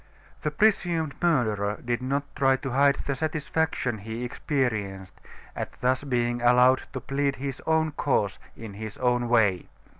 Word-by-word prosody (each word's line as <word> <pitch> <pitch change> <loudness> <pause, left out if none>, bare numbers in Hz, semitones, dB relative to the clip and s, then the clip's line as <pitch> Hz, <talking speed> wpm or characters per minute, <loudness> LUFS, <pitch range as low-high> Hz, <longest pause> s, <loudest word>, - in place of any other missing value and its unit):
The 150 - 0
presumed 170 -3 +1
murderer 110 -11 +1
did 120 0 -1
not 140 +2 -1
try 135 -1 +3
to 135 0 -5
hide 140 +2 +4
the 140 - 0
satisfaction 150 -4 -1
he 110 +4 -6
experienced 110 -8 -2 0.3
at - - -6
thus 130 +2 +1
being 120 -3 0
allowed 125 +2 +5
to 130 - -3
plead 140 +2 -1
his 135 -1 -5
own 160 -1 +2
cause, 120 -9 0 0.2
in 110 -3 -8
his 110 +1 -7
own 125 -1 +1
way. 105 -7 +2
130 Hz, 150 wpm, -26 LUFS, 115-145 Hz, 0.3 s, allowed